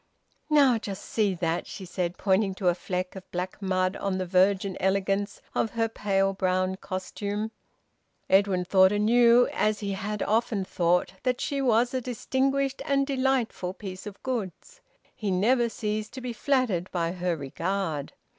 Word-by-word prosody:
"Now 275 Hz, -6 st, +5 dB
just 195 Hz, -3 st, -6 dB
see 205 Hz, -4 st, +1 dB
that!" 170 Hz, 0 st, -1 dB
she 190 Hz, -, -8 dB
said, 180 Hz, -1 st, -3 dB
pointing 195 Hz, 0 st, +1 dB
to 185 Hz, -2 st, +1 dB
a -, -, +3 dB
fleck 180 Hz, +1 st, -4 dB
of 190 Hz, -, -10 dB
black 180 Hz, +3 st, -4 dB
mud 185 Hz, 0 st, 0 dB
on 195 Hz, -1 st, -1 dB
the 185 Hz, -, -2 dB
virgin 190 Hz, +1 st, +2 dB
elegance 195 Hz, +1 st, 0 dB
of 225 Hz, -, +1 dB
her 225 Hz, -1 st, +1 dB
pale 195 Hz, -3 st, 0 dB
brown 185 Hz, 0 st, 0 dB
costume. 205 Hz, +3 st, -4 dB, 0.8 s
Edwin 190 Hz, -2 st, +3 dB
thought 190 Hz, 0 st, +5 dB
anew, 235 Hz, +3 st, +5 dB
as 215 Hz, 0 st, +1 dB
he 200 Hz, -1 st, -2 dB
had 205 Hz, +2 st, -3 dB
often 220 Hz, -3 st, 0 dB
thought, 175 Hz, 0 st, +1 dB
that 250 Hz, -1 st, 0 dB
she 280 Hz, -1 st, -1 dB
was 240 Hz, -1 st, +3 dB
a 260 Hz, -, 0 dB
distinguished 270 Hz, +3 st, -1 dB
and 275 Hz, 0 st, +1 dB
delightful 260 Hz, -9 st, 0 dB
piece 190 Hz, 0 st, -8 dB
of 200 Hz, -1 st, -10 dB
goods. 255 Hz, -, -5 dB, 0.3 s
He 210 Hz, -, -3 dB
never 235 Hz, +6 st, +3 dB
ceased 215 Hz, -1 st, -3 dB
to 260 Hz, -, -7 dB
be 245 Hz, -1 st, -4 dB
flattered 230 Hz, -9 st, 0 dB
by 170 Hz, -2 st, -1 dB
her 180 Hz, -1 st, -1 dB
regard. 160 Hz, +1 st, -3 dB
200 Hz, 160 wpm, -27 LUFS, 185-235 Hz, 0.8 s, Now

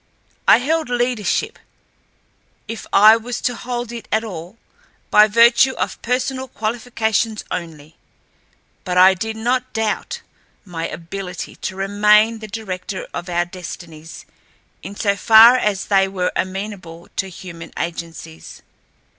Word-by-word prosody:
I -, -, +8 dB
held 310 Hz, +4 st, -1 dB
leadership, 245 Hz, -3 st, -1 dB, 1.1 s
if 225 Hz, -, -7 dB
I 215 Hz, +3 st, +7 dB
was 240 Hz, +2 st, -5 dB
to 245 Hz, -, 0 dB
hold 240 Hz, 0 st, -5 dB
it 230 Hz, -3 st, -8 dB
at 220 Hz, +1 st, +1 dB
all, 185 Hz, -1 st, -8 dB, 0.5 s
by 210 Hz, 0 st, +7 dB
virtue 235 Hz, +4 st, +5 dB
of -, -, -4 dB
personal 260 Hz, +2 st, -2 dB
qualifications 220 Hz, -1 st, -2 dB
only, 160 Hz, -3 st, -7 dB, 0.9 s
but 180 Hz, -1 st, -2 dB
I 185 Hz, +1 st, +7 dB
did 220 Hz, +4 st, -4 dB
not 250 Hz, +3 st, -1 dB
doubt 220 Hz, -2 st, -2 dB, 0.4 s
my 170 Hz, -3 st, -4 dB
ability 180 Hz, +2 st, -7 dB
to 190 Hz, -, -5 dB
remain 210 Hz, +3 st, +3 dB
the 215 Hz, -, -8 dB
director 195 Hz, -3 st, -6 dB
of 175 Hz, -, -5 dB
our 175 Hz, 0 st, 0 dB
destinies 170 Hz, -3 st, -10 dB, 0.6 s
in 200 Hz, -, -8 dB
so 200 Hz, -1 st, 0 dB
far 225 Hz, +4 st, +8 dB
as 210 Hz, -6 st, 0 dB
they 195 Hz, -1 st, +3 dB
were 185 Hz, -2 st, -2 dB
amenable 185 Hz, -3 st, -5 dB
to 195 Hz, -, -1 dB
human 175 Hz, -2 st, -10 dB
agencies. 165 Hz, -, -7 dB
210 Hz, 130 wpm, -20 LUFS, 180-230 Hz, 1.1 s, I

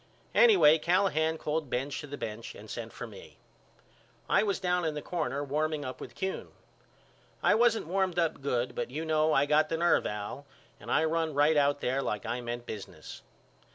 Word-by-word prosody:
Anyway 395 Hz, -, +6 dB
Callahan 160 Hz, -3 st, +2 dB
called 150 Hz, -2 st, -2 dB
Benz 135 Hz, +3 st, -2 dB
to 150 Hz, -, -8 dB
the 145 Hz, 0 st, -7 dB
bench 110 Hz, -1 st, -6 dB
and -, -, -11 dB
sent -, -, -6 dB
for -, -, -7 dB
me. -, -, -13 dB, 0.9 s
I -, -, +4 dB
was 200 Hz, -3 st, 0 dB
down 180 Hz, -1 st, 0 dB
in 155 Hz, -2 st, -1 dB
the 150 Hz, -, -4 dB
corner 150 Hz, -5 st, -2 dB
warming 150 Hz, +1 st, -1 dB
up 130 Hz, -, -6 dB
with -, -, -9 dB
Kuhn. 190 Hz, 0 st, -3 dB, 1.0 s
I -, -, +5 dB
wasn't 225 Hz, 0 st, +3 dB
warmed 185 Hz, +1 st, 0 dB
up 165 Hz, -4 st, 0 dB
good 125 Hz, -3 st, -1 dB
but -, -, -3 dB
you 155 Hz, +5 st, -4 dB
know 155 Hz, 0 st, +2 dB
I 140 Hz, -1 st, +4 dB
got 150 Hz, +1 st, +3 dB
the 165 Hz, -, -1 dB
nerve 170 Hz, +1 st, +3 dB
Al 105 Hz, +7 st, -6 dB, 0.3 s
and -, -, -11 dB
I 155 Hz, -, +3 dB
run 160 Hz, -1 st, 0 dB
right 150 Hz, +2 st, +4 dB
out 145 Hz, 0 st, +2 dB
there 130 Hz, +2 st, 0 dB
like 105 Hz, -5 st, -3 dB
I 120 Hz, +2 st, -2 dB
meant 120 Hz, 0 st, -5 dB
business. 105 Hz, -4 st, -8 dB
155 Hz, 190 wpm, -30 LUFS, 135-165 Hz, 1.0 s, Anyway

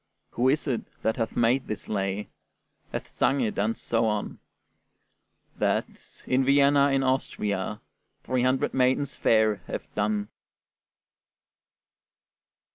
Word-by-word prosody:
Who 125 Hz, +2 st, +2 dB
is 150 Hz, +3 st, +1 dB
it 130 Hz, -6 st, -1 dB, 0.2 s
that 110 Hz, -, +1 dB
hath 115 Hz, -2 st, -2 dB
made 120 Hz, +3 st, +2 dB
this 105 Hz, -, -5 dB
lay, 100 Hz, 0 st, -2 dB, 0.6 s
Hath -, -, -4 dB
sung 140 Hz, +2 st, +2 dB
it, 110 Hz, -4 st, -1 dB
and 110 Hz, +3 st, 0 dB
so 115 Hz, -1 st, 0 dB
on? 105 Hz, -1 st, -2 dB, 1.2 s
That, -, -, -3 dB
in 130 Hz, +1 st, +2 dB
Vienna 140 Hz, +1 st, +5 dB
in 135 Hz, -1 st, +2 dB
Austria, 105 Hz, -6 st, -1 dB, 0.4 s
Three 130 Hz, -1 st, 0 dB, 0.3 s
maidens 130 Hz, +2 st, +1 dB
fair 110 Hz, -2 st, +3 dB
have -, -, -4 dB
done. 105 Hz, 0 st, -1 dB
115 Hz, 115 wpm, -26 LUFS, 105-135 Hz, 1.2 s, Vienna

